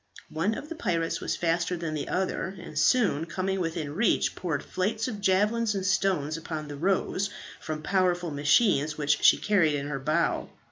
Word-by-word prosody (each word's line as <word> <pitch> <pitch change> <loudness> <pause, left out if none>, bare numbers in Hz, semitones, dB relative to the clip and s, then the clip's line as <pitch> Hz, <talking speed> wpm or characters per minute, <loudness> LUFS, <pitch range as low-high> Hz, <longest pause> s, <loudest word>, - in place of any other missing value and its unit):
One 190 +8 0
of 290 - -7
the 330 - -5
pirates 170 - -1
was - - -1
faster 170 +1 0
than 165 -2 -4
the 150 -2 -4
other, 190 +1 -2
and 165 - -10
soon 180 - +3
coming 190 +2 -2
within 165 -4 -3
reach, 215 +7 +2
poured 155 -6 -3
flights 215 +5 -2
of 210 -5 -5
javelins 210 +3 +2
and 190 -1 -2
stones 175 -6 +1
upon 160 -2 -5
the 145 - -7
"Rose" 190 +4 0 0.3
from 155 -1 -5
powerful 180 -3 +1
machines, 150 +1 +2
which 150 -1 +1
she - - +7
carried 180 -8 +2
in 140 0 -3
her 140 -2 -3
bow. 155 +5 0
175 Hz, 180 wpm, -27 LUFS, 155-195 Hz, 0.3 s, she